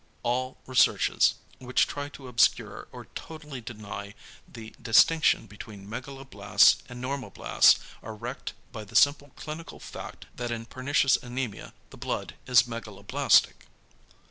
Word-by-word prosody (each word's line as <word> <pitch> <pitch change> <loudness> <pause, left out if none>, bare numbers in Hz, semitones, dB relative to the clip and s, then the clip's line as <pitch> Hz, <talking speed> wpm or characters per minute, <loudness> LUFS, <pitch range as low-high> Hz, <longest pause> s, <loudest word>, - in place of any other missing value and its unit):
=All 130 +2 -1
researches, 130 -1 +3 0.2
which 125 0 +2
try 145 0 -5
to 140 -2 -12
obscure 120 -1 +1
or - - -10
totally 150 -5 -8
deny 105 -2 -8 0.4
the 110 -2 -10
distinction 120 +6 +4
between 105 -1 -11
megaloblasts 115 -3 +2
and 125 0 -8
normoblasts 130 -6 +3 0.2
are 110 0 -8
wrecked 105 - -6 0.2
by 110 - -7
the 100 - -15
simple 145 +1 +4
clinical 155 +2 -8
fact - - -9
that 120 -1 -4
in 115 -1 -4
pernicious 130 +2 +2
anæmia 120 -4 -5 0.2
the - - -12
blood - - -4
is 125 -2 +6
megaloblastic. 115 -4 +1
125 Hz, 125 wpm, -27 LUFS, 110-135 Hz, 0.4 s, is